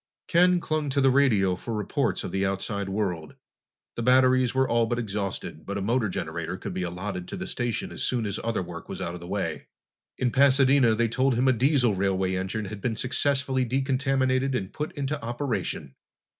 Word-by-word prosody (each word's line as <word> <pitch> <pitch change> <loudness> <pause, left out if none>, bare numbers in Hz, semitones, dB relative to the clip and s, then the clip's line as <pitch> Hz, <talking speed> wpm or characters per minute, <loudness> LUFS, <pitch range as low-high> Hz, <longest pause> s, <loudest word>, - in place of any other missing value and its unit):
Ken 180 +1 +4
clung 155 -3 -2
to 140 +1 0
the 135 -1 +5
radio 110 -9 +3
for 115 +5 -5
reports 105 -2 -1
of - - -5
the 95 0 0
outside 95 +1 -2
world. 90 -7 -3 0.6
The - - -3
batteries 130 +1 +4
were 130 0 +3
all 115 -1 +2
but 120 - -1
exhausted, 100 -4 -4
but 100 0 -4
a - - -2
motor 115 0 +1
generator - - -4
could - - -6
be - - -3
allotted 90 +1 -4
to - - -6
the 190 - -4
station 120 - -2
as - - -6
soon 120 -3 0
as 100 0 -3
other 115 -4 -1
work 85 -1 -9
was - - -5
out 85 - -3
of 90 - -7
the 85 - -10
way. 100 +1 -3 0.5
In 125 -1 0
Pasadena, 135 -3 +5
they 115 +1 +2
told 130 +2 +1
him 125 +3 +2
a 130 - +5
diesel 125 -2 +3
railway 95 -1 0
engine 95 +4 -3
had 100 +1 -7
been 115 0 -1
successfully 135 +1 +1
decontaminated 130 +1 +1
and 95 -6 -3
put 150 +1 -4
into 145 0 -3
operation. 120 - -3
120 Hz, 200 wpm, -26 LUFS, 100-135 Hz, 0.6 s, the